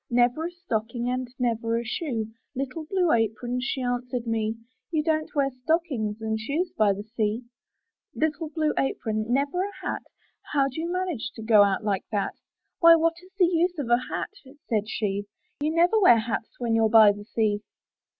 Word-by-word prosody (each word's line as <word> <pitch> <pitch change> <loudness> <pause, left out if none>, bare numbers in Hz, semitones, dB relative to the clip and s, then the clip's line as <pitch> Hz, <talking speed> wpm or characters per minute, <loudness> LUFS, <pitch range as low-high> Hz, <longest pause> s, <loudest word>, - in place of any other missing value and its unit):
Never 245 +7 +2
a - - -8
stocking 240 -8 -3
And 255 0 -2
never 230 -2 0
a 235 - -3
shoe! 225 -3 -3 0.2
Little 275 +4 -4
Blue 360 0 +1
Apron 235 +2 0
She 260 0 -2
answered 245 0 -2
me, 225 -1 -1 0.4
''You 310 -2 +1
don't 310 0 0
wear 275 -1 +2
stockings 255 -6 -1
And 220 0 -1
shoes 305 +11 -2
by 215 -2 +4
the 200 +1 -3
sea/' 220 +1 -2 0.7
Little 315 0 -1
Blue 310 -1 0
Apron 215 -5 -1
— - - -13
Never 285 +7 +1
a 405 +1 -3
hat? - - -2 0.5
How 275 -2 +3
do 275 +5 -5
you 340 +1 -3
manage 360 -9 -2
To 225 - -8
go 215 -2 +6
out 200 +1 +3
like 200 -3 -1
that? 205 -2 -1 0.5
''Why, 335 -1 +9
what 330 0 +2
is 370 - -18
the 370 - +6
use 350 +1 +1
Of 260 -5 -3
a 240 +1 +5
hat?*' - - -3 0.3
said 215 -2 0
she, 205 -3 -2 0.3
"You 295 +1 0
never 345 +7 +3
wear 300 - +7
hats 225 0 -3
When 235 -2 0
you're 225 -1 +3
by 215 -2 +8
the 205 0 -8
sea." 210 -2 0
245 Hz, 190 wpm, -26 LUFS, 220-315 Hz, 0.7 s, Why